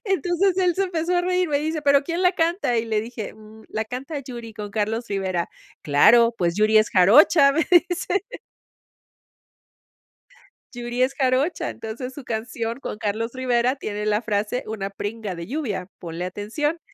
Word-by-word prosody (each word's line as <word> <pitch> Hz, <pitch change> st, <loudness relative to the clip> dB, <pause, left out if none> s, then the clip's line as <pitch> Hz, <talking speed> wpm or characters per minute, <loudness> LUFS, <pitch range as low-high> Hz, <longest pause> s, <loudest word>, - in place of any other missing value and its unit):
Entonces 385 Hz, -1 st, +1 dB
él 360 Hz, -2 st, +2 dB
se 390 Hz, -, 0 dB
empezó 355 Hz, -1 st, -1 dB
a -, -, +3 dB
reír. 365 Hz, -1 st, +1 dB
Me 285 Hz, -, +1 dB
dice: 310 Hz, +1 st, -2 dB
"¿Pero 280 Hz, 0 st, +4 dB
quién 335 Hz, +4 st, -3 dB
la 360 Hz, 0 st, +4 dB
canta?". 335 Hz, -, 0 dB
Y 225 Hz, -, +1 dB
le 220 Hz, -2 st, 0 dB
dije: 225 Hz, -1 st, -6 dB
"Mm, 220 Hz, 0 st, -15 dB
la 220 Hz, 0 st, -2 dB
canta 265 Hz, +6 st, -5 dB
Yuri 240 Hz, -4 st, -8 dB
con 210 Hz, -1 st, -7 dB
Carlos 220 Hz, +3 st, -2 dB
Rivera". 190 Hz, -3 st, -2 dB, 0.3 s
Claro, 230 Hz, +11 st, +5 dB
pues, 170 Hz, -3 st, 0 dB
Yuri 215 Hz, +1 st, +3 dB
es 215 Hz, +1 st, +4 dB
jarocha, 275 Hz, -, +6 dB
me 320 Hz, +2 st, +1 dB, 0.2 s
dice. 360 Hz, +2 st, -1 dB, 2.5 s
Yuri 240 Hz, +1 st, -2 dB
es 260 Hz, +1 st, +1 dB
jarocha, 265 Hz, +5 st, 0 dB
entonces 240 Hz, +4 st, -7 dB
su 275 Hz, -1 st, -10 dB
canción 230 Hz, +1 st, -4 dB
con 210 Hz, -, -6 dB
Carlos 220 Hz, +3 st, -2 dB
Rivera 255 Hz, 0 st, +1 dB
tiene 210 Hz, -5 st, -4 dB
la 210 Hz, 0 st, +1 dB
frase 215 Hz, +2 st, -2 dB
una 205 Hz, -3 st, -4 dB
pringa 205 Hz, 0 st, -5 dB
de 170 Hz, 0 st, -7 dB
lluvia. 225 Hz, -, -3 dB
Ponle 170 Hz, 0 st, -6 dB
atención. 225 Hz, -, -3 dB
235 Hz, 165 wpm, -23 LUFS, 215-295 Hz, 2.5 s, jarocha